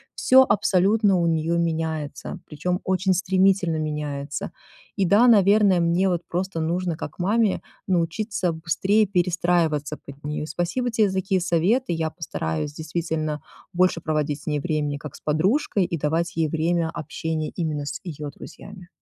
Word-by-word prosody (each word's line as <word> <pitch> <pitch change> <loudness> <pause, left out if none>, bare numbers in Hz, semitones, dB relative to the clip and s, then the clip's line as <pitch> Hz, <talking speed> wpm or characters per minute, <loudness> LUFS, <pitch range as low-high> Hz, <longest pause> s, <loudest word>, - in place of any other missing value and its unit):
всё 265 +1 +6
абсолютно 200 +1 +3
у 170 - +1
неё 165 +1 +1
меняется, 160 0 -3
причём 180 +4 -2
очень 190 0 +1
стремительно 185 -2 +2
меняется. 150 -2 -4 0.5
И 195 - +3
да, 205 +7 +5
наверное, 200 -3 +5
мне 170 +3 +2
вот 175 -2 0
просто 180 0 -2
нужно 170 +1 -1
как 150 - -7
маме 210 +3 +1 0.3
научиться 185 +2 0
быстрее 190 +6 +1
перестраиваться 175 -5 +1
под 140 - -12
неё. 150 +1 -3
Спасибо 175 +10 -2
те 220 -3 +2
за 190 - -4
такие 190 0 0
советы. 180 +7 +1
Я 160 -1 -1
постараюсь 150 - -4
действительно 155 -1 -3 0.3
больше 180 -1 +2
проводить 150 -2 -1
с - - -18
ней 150 -1 0
времени 150 -2 -1
как 150 -1 -9
с - - -14
подружкой, 190 - +1
и 170 - -3
давать 165 +3 -1
ей 160 -2 +1
время 165 +1 0
общения 160 0 -4
именно 155 -4 -2
с 145 - -5
её 150 -4 -5
друзьями. 180 +4 -12
170 Hz, 150 wpm, -24 LUFS, 155-190 Hz, 0.5 s, всё